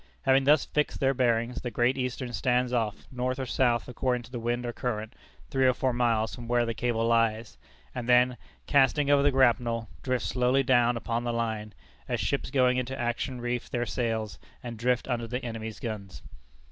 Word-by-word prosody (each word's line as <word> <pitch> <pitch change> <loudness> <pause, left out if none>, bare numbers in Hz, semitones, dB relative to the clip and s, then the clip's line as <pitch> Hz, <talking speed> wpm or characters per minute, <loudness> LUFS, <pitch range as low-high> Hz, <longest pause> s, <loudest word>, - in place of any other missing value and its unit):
Having 135 0 +4
thus 145 +1 +5
fixed 150 0 -1
their 135 0 +2
bearings, 120 -1 0
the 125 - -3
Great 120 +2 +1
Eastern 125 -1 -3
stands 125 +3 +1
off, 110 -4 -1
north 125 0 -2
or 135 - -3
south 120 -1 +1
according 125 0 -1
to 115 - -15
the 120 - -4
wind 120 +1 -2
or 120 - -3
current, 110 -2 -3 0.4
three 130 -1 +3
or 130 - +3
four 130 -1 0
miles 115 -2 +1
from 120 -1 -8
where 120 0 +2
the 115 - -2
cable 115 -1 -1
lies, 115 -1 +1 0.3
and 125 0 -5
then, 125 0 +5 0.3
casting 140 +1 +3
over 140 -1 +5
the 145 - +4
grapnel, 120 -3 +2
drifts 130 -3 -1
slowly 125 +2 +2
down 120 -2 +3
upon 115 +1 -2
the 120 - -1
line, 110 -3 -3 0.3
as - - -1
ships - - -1
going 125 -2 +3
into 130 +2 -3
action 120 +2 -2
reef 120 0 -3
their 120 -1 -1
sails, 110 -3 -2 0.2
and 120 -2 -7
drift 125 +1 +1
under 120 -3 -2
the 125 +2 -4
enemy's 110 -1 -6
guns. 105 -5 -6
120 Hz, 195 wpm, -28 LUFS, 115-130 Hz, 0.4 s, thus